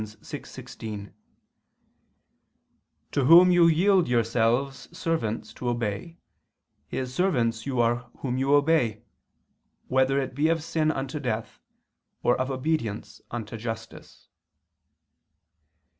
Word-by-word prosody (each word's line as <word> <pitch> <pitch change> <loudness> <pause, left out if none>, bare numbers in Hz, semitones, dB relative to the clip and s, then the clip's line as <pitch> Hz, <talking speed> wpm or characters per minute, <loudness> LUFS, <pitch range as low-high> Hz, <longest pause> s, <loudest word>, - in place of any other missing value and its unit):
6:16): 105 -1 -8 2.0
"To 140 - +1
whom 175 +5 +8
you 175 -1 +6
yield 180 +2 +4
yourselves 120 +2 0
servants 115 -10 -2
to 125 - -3
obey, 120 - -3 0.7
his 130 -1 -4
servants 125 -10 0
you 130 -3 -1
are 120 +1 +1
whom 125 -2 -2
you 135 +2 0
obey, 145 -8 +2 0.9
whether 130 +1 +3
it 135 -2 -3
be 145 +4 +1
of 165 -2 0
sin 155 -1 0
unto 135 0 -3
death, 115 -5 -4 0.6
or 120 - +4
of 130 - -2
obedience 130 -6 -3
unto 115 -1 -5
justice." 115 0 -8
130 Hz, 105 wpm, -26 LUFS, 115-155 Hz, 2.0 s, whom